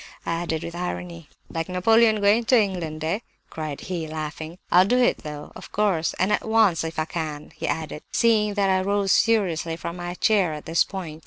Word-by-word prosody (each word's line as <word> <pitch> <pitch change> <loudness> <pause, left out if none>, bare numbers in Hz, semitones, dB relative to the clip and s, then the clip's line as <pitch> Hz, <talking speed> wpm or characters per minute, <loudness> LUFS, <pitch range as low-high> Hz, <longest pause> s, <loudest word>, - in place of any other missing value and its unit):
I 165 - -1
added 160 -2 -2
with 170 - -6
irony. 175 -2 -5 0.2
"'Like 165 +1 -4
Napoleon 220 +4 +4
going 205 +4 +4
to 250 +1 +5
England, 170 -7 -2
eh?' 165 +6 0 0.3
cried 155 -3 -5
he, 170 -4 -4
laughing. 155 +1 -6
'I'll 180 +1 +6
do 245 +5 +2
it 250 -1 +3
though—of 150 -1 -9
course, 190 -6 +1
and 185 +3 +1
at - - +1
once, 220 -7 +3
if 160 0 -5
I 155 - 0
can!' 155 -3 -5
he - - -4
added, 155 -1 -3
seeing 215 -3 +2
that 200 -2 +2
I 185 0 +2
rose 200 0 +1
seriously 180 -8 +2
from 170 +1 -6
my 175 0 -5
chair 195 -5 +2
at 150 - -9
this 165 +1 +3
point. 170 -5 -7
175 Hz, 195 wpm, -24 LUFS, 160-205 Hz, 0.3 s, I'll